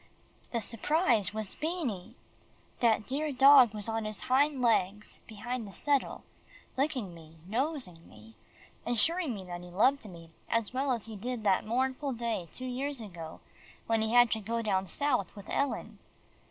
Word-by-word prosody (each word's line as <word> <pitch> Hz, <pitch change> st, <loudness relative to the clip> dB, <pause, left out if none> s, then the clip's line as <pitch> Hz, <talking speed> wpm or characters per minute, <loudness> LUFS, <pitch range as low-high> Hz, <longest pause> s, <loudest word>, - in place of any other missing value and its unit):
The 235 Hz, -, -1 dB
surprise 230 Hz, -, +1 dB
was 215 Hz, -2 st, -4 dB
Beanie. 255 Hz, -, -3 dB, 0.6 s
That 220 Hz, -3 st, +3 dB
dear 295 Hz, +3 st, -1 dB
dog 265 Hz, -4 st, +7 dB
was 210 Hz, 0 st, -4 dB
on 225 Hz, -1 st, -2 dB
his 215 Hz, -1 st, -4 dB
hind 280 Hz, +2 st, +2 dB
legs 210 Hz, -4 st, +1 dB
beside 225 Hz, +2 st, -5 dB
the -, -, -9 dB
settle, 285 Hz, +5 st, 0 dB, 0.5 s
licking 260 Hz, -, -1 dB
me, 160 Hz, -1 st, -14 dB
nosing 240 Hz, -, -3 dB
me, 110 Hz, +1 st, -15 dB, 0.5 s
assuring 285 Hz, +4 st, +1 dB
me 195 Hz, -, -7 dB
that 175 Hz, -1 st, -7 dB
he 180 Hz, -, -10 dB
loved 220 Hz, +6 st, +2 dB
me 165 Hz, -2 st, -12 dB, 0.2 s
as 230 Hz, 0 st, 0 dB
well 265 Hz, +1 st, 0 dB
as 235 Hz, -4 st, -1 dB
he 225 Hz, -1 st, -8 dB
did 235 Hz, +2 st, -4 dB
the 195 Hz, -3 st, +3 dB
mournful 260 Hz, +4 st, -1 dB
day 230 Hz, -7 st, -2 dB
two 255 Hz, -, -7 dB
years 265 Hz, +2 st, -3 dB
ago, 170 Hz, -7 st, -8 dB, 0.4 s
when 225 Hz, -1 st, +1 dB
he 220 Hz, 0 st, 0 dB
had 245 Hz, -1 st, +6 dB
to 220 Hz, -, +1 dB
go 230 Hz, +2 st, -2 dB
down 195 Hz, -3 st, 0 dB
South 250 Hz, -, 0 dB
with 200 Hz, -1 st, -11 dB
Ellen. 280 Hz, -1 st, -2 dB
230 Hz, 165 wpm, -31 LUFS, 200-265 Hz, 0.6 s, dog